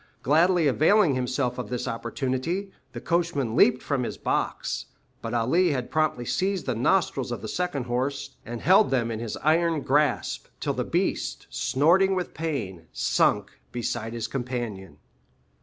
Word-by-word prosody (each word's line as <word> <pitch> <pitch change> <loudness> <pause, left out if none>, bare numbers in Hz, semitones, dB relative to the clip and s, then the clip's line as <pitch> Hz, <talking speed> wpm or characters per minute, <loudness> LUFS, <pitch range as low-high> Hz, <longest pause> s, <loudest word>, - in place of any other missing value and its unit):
Gladly 165 +5 +4
availing 155 +5 +4
himself 125 0 -1
of 115 -5 -5
this 125 0 -3
opportunity, 130 +11 -2 0.2
the - - -5
coachman 165 -9 0
leaped 125 0 +4
from 140 -3 -1
his 120 - -4
box; - - -2 0.3
but 115 +1 -4
Ali 155 +9 +2
had 125 -2 -3
promptly 155 -6 0
seized 190 +6 -1
the 130 - 0
nostrils 130 - +1
of 120 - -5
the - - -4
second 175 -2 -2
horse, 130 +3 -2
and 120 -1 -6
held 195 +4 +5
them 120 -3 0
in 110 - -3
his 115 -2 -4
iron 160 0 +2
grasp, 145 0 +1
till - - -1
the - - -1
beast, - - -1
snorting 170 - +3
with 180 -1 -3
pain, 110 - -4
sunk - - +1 0.2
beside 120 -1 -3
his 115 -2 -3
companion. 120 - -5
130 Hz, 155 wpm, -26 LUFS, 120-165 Hz, 0.3 s, held